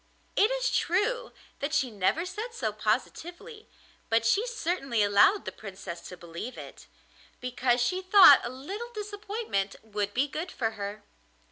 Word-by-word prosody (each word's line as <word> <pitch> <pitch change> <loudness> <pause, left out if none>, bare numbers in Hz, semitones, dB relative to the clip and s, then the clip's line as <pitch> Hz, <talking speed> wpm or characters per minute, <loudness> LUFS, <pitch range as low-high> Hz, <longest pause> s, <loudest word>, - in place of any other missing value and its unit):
It 420 - +4
is - - 0
true 470 +8 0 0.3
that 290 +2 -2
she 265 -4 +1
never 215 - 0
said 435 +6 -6
so 220 -4 -1
positively, 345 - -3 0.4
but 225 0 +2
she 410 - +2
certainly 340 - -1
allowed 205 - +4
the - - -4
Princess 190 -4 -8
to 180 - -9
believe 170 +9 -7
it, - - -11 0.5
because 250 0 0
she 365 +10 0
thought 370 -7 +8
a - - -3
little 390 - -7
disappointment 415 - -3
would 205 -2 -3
be 270 +4 +2
good 320 +5 -5
for 225 -3 -1
her. 205 -1 -6
275 Hz, 150 wpm, -28 LUFS, -, 0.5 s, thought